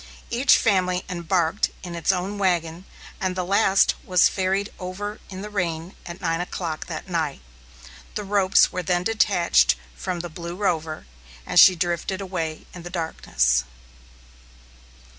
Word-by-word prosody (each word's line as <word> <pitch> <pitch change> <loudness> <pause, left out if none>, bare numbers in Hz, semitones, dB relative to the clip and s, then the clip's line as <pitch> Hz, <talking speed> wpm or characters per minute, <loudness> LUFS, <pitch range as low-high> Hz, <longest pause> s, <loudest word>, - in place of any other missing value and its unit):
Each 245 +4 +5
family 185 -4 +1
embarked 175 +1 0
in 175 -2 -6
its 170 +2 +1
own 190 +2 -3
wagon, 175 -2 0 0.3
and 185 -2 -1
the 185 -1 -2
last 195 +1 +3
was 180 -1 +4
ferried 195 +2 -1
over 205 +3 -5
in 190 0 -7
the 210 - -6
rain 175 -3 -3
at 170 +1 -8
nine 165 +1 -1
o'clock 170 -3 -4
that 165 +2 -6
night. 165 -5 -2 0.8
The 210 - -3
ropes 195 -1 +3
were 180 - -3
then 175 0 0
detached 200 -5 +3 0.2
from 180 -2 -4
the 175 - -5
Blue 170 +2 -7
Rover, 160 -5 -2 0.4
and - - +3
she 185 - +9
drifted 175 +2 -2
away 170 -5 -4
in 175 - -9
the 175 - -8
darkness. 65 - 0
180 Hz, 145 wpm, -24 LUFS, 170-195 Hz, 0.8 s, she